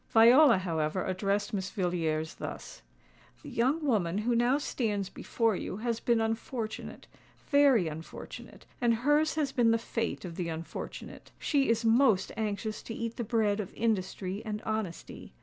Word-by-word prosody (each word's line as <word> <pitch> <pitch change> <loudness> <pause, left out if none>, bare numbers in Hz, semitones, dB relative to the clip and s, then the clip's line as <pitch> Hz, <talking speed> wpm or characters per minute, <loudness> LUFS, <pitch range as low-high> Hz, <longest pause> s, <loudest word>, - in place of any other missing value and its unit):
Viola, 240 +2 +7
however, 165 -1 -1
addressed 200 +3 -1
Miss 190 -1 -2
Villiers 165 -5 -1
thus:—"The - - -11
young 275 +7 +1
woman 195 -9 +1
who 230 +3 +1
now 240 +3 +3
stands 210 -9 -2
before 225 -3 0
you 185 - -4
has 230 +1 -2
been 235 -1 +2
unfortunate—very 225 - 0
unfortunate; 160 +1 -9 0.2
and 235 -1 +3
hers 295 +6 +2
has 295 -4 0
been 240 -3 +3
the 230 - +4
fate 230 -2 -3
of 170 -2 -7
the 175 -2 -2
unfortunate. 165 0 -7
She 280 -4 +1
is 230 0 +1
most 225 -4 +4
anxious 215 0 -3
to 225 - -7
eat 230 0 -4
the 240 - -2
bread 215 -2 +1
of 200 - -4
industry 200 -3 -1
and 210 -2 -4
honesty. 215 - -5
220 Hz, 150 wpm, -30 LUFS, 185-235 Hz, 0.2 s, Viola